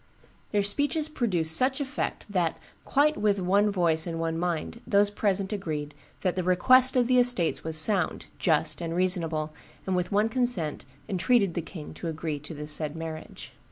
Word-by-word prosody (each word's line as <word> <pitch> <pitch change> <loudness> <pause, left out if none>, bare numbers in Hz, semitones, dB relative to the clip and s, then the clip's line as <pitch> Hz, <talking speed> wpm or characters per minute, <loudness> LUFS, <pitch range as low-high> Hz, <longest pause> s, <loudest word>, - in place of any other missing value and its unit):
Their 205 -1 +1
speeches 290 +9 0
produced 180 - 0
such 260 - +1
effect 285 0 -3
that, 180 -5 0 0.3
'quite 300 +2 +2
with 205 -2 +1
one 200 +3 +2
voice 170 -4 +1
and 165 -1 -4
one 165 0 -1
mind, 175 +6 -3
those 205 0 +3
present 200 -1 0
agreed 155 -7 -4 0.3
that 185 -2 0
the 185 - 0
request 255 +9 +4
of 250 -1 +4
the 250 0 +4
estates 245 -9 0
was 160 0 -3
sound, 180 +1 +2
just, 155 -1 +1
and 165 0 -3
reasonable, 165 -4 0 0.3
and 190 - 0
with 180 +1 -1
one 205 +2 +3
consent 225 - 0 0.2
entreated 200 0 +2
the 170 - -2
king 160 -2 -9
to 170 - -6
agree 160 -2 -3
to 150 +2 -9
the 150 +1 -6
said 150 0 -1
marriage. 160 -1 -8
180 Hz, 175 wpm, -27 LUFS, 160-215 Hz, 0.3 s, request